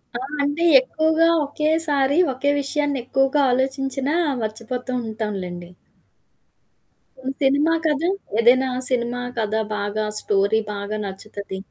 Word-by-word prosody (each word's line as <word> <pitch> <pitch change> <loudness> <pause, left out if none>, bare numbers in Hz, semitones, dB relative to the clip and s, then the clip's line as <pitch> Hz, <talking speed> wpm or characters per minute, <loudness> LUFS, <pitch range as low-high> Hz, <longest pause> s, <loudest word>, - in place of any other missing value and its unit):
ఆ! - - -2 0.2
అంటే 290 +4 -1 0.2
ఎక్కువగా 315 +4 +1 0.2
ఒకేసారి 295 -1 +2 0.2
ఒకే 280 +3 0
విషయాన్ని 285 -1 -1
ఎక్కువగా 270 +3 +1
ఆలోచించినా 270 +2 -1 0.3
మర్చిపోతూ 230 +4 -5
ఉంటాంలెండి. 195 -6 -5 1.5
హ్మ్, 265 - -3
సినిమా 285 +4 +3
కథా 310 +2 +1 0.3
ఏదైనా 250 +3 +4 0.2
సినిమా 245 -1 -1 0.2
కథ 215 -1 -1 0.2
బాగా 205 +1 -2
స్టోరీ 200 +2 +2
బాగా 200 +1 -4
నచ్చుతది. 200 0 -7
260 Hz, 105 wpm, -22 LUFS, 215-285 Hz, 1.5 s, ఏదైనా